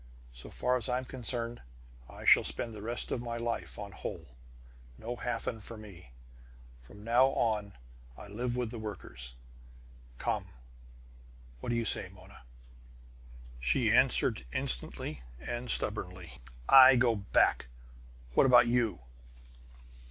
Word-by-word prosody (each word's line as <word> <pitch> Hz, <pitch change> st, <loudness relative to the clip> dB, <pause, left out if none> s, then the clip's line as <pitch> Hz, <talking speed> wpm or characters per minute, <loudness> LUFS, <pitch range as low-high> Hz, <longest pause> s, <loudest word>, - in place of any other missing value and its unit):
"So -, -, -12 dB
far 125 Hz, 0 st, 0 dB
as 120 Hz, -2 st, -5 dB
I'm 125 Hz, +1 st, -1 dB
concerned, 120 Hz, -2 st, -4 dB, 0.5 s
I -, -, -11 dB
shall -, -, +6 dB
spend 115 Hz, -, -3 dB
the 105 Hz, -, -9 dB
rest 120 Hz, +3 st, -4 dB
of 120 Hz, -, -2 dB
my 120 Hz, -1 st, -5 dB
life 115 Hz, 0 st, -4 dB
on 100 Hz, -1 st, -8 dB
Holl! 90 Hz, -, -7 dB, 0.7 s
No 120 Hz, +2 st, -6 dB
Hafen 115 Hz, -2 st, -4 dB
for 115 Hz, +2 st, -10 dB
mine! 100 Hz, -7 st, -13 dB, 0.7 s
From 105 Hz, +12 st, -15 dB
now 120 Hz, +4 st, +4 dB
on 105 Hz, -6 st, -1 dB, 0.4 s
I 105 Hz, -, -11 dB
live 120 Hz, +4 st, -4 dB
with 120 Hz, -3 st, -3 dB
the 120 Hz, -, -7 dB
workers. 60 Hz, -, -8 dB, 0.8 s
Come -, -, -3 dB, 1.1 s
what -, -, -6 dB
do 120 Hz, -, 0 dB
you 115 Hz, -1 st, -1 dB
say, -, -, +4 dB
Mona?" -, -, -16 dB, 1.2 s
She 60 Hz, 0 st, +1 dB
answered 60 Hz, -, +6 dB
instantly 60 Hz, +3 st, -2 dB, 0.2 s
and 120 Hz, -, -6 dB
stubbornly: 90 Hz, -, -1 dB, 0.3 s
"I 130 Hz, -1 st, +9 dB
go 120 Hz, -2 st, +2 dB
back. 95 Hz, -, +1 dB, 0.7 s
What 135 Hz, -, +4 dB
about 120 Hz, -1 st, +6 dB
you?" 115 Hz, -, 0 dB
115 Hz, 130 wpm, -30 LUFS, 100-120 Hz, 1.2 s, I